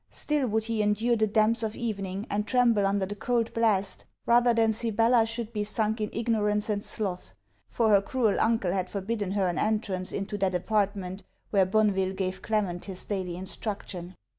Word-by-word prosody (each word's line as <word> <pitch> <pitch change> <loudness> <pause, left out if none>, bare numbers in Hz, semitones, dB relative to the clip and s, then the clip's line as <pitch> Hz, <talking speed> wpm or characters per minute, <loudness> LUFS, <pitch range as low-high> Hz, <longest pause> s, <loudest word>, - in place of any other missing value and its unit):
Still, 295 -3 -1
would 220 0 0
he 225 -1 -1
endure 215 +3 +2
the 220 -1 +2
damps 220 +2 +3
of 220 -1 -2
evening, 200 -3 -3
and 210 +1 -2
tremble 235 -5 +3
under 195 0 0
the 200 - -5
cold 230 +1 -1
blast, 210 -4 +1 0.2
rather 240 +1 +5
than 225 -1 +3
Sibella 225 +1 +2
should 230 0 -4
be 210 -1 -1
sunk 215 +1 -1
in 210 - -1
ignorance 215 -2 0
and 205 -1 -2
sloth; 190 -5 -4 0.3
for 230 -2 +1
her 200 -2 +6
cruel 220 0 0
uncle 225 -5 +2
had 185 -1 -1
forbidden 200 -1 -3
her 195 -2 +1
an 175 -3 -1
entrance 205 -4 -1
into 205 +1 -4
that 190 -2 +1
apartment 195 0 -1 0.3
where 195 -3 +4
Bonneville 195 -2 +2
gave 190 -1 -3
Clement 200 -6 -1
his 190 -2 0
daily 185 -4 -3
instruction. 185 -1 -5
210 Hz, 180 wpm, -27 LUFS, 195-225 Hz, 0.3 s, her